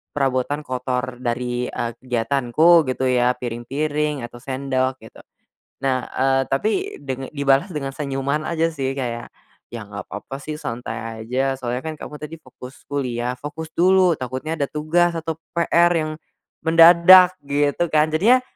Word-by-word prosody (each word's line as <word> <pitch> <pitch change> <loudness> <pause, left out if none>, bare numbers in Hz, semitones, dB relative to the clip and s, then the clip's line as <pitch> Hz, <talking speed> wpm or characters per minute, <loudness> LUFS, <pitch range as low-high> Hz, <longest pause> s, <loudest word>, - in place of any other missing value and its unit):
perabotan 135 +1 0
kotor 125 -1 -3
dari, 125 0 -2
eee, 115 - -3
kegiatanku 130 +6 +3
gitu 130 0 0
ya 125 0 +2
piring-piring 140 +4 -2
atau 120 0 -9
sendok," 130 0 -1
gitu. 110 - -14 0.7
Nah, 130 -2 0
eee, 135 0 +1
tapi 220 - -1
deng 135 -1 -6
dibalas 140 +4 +1
dengan 140 -5 -4
senyuman 140 +1 -2
aja 165 0 0
sih 135 -2 -3
kayak, 120 -3 -4 0.4
"Ya 115 -3 -7
gak 100 -2 -9
papa 135 +1 -7
sih 155 +2 -6
santai 115 -4 -6
aja 130 +4 -1
soalnya 125 +2 -4
kan 160 - -3
kamu 150 - -8
tadi 150 +2 -8
fokus 130 -1 -13
kuliah, 125 -3 -2
fokus 150 +3 -7
dulu 185 -1 +4
takutnya 130 +6 -4
ada 145 - 0
tugas 160 +4 +1
atau 160 -1 -4 0.2
PR 170 0 +3
yang 155 -2 -1 0.5
mendadak," 175 +3 +8
gitu 145 +3 +1
kan. 155 0 +4
Jadinya, 215 +12 +4
135 Hz, 145 wpm, -21 LUFS, 125-155 Hz, 0.7 s, mendadak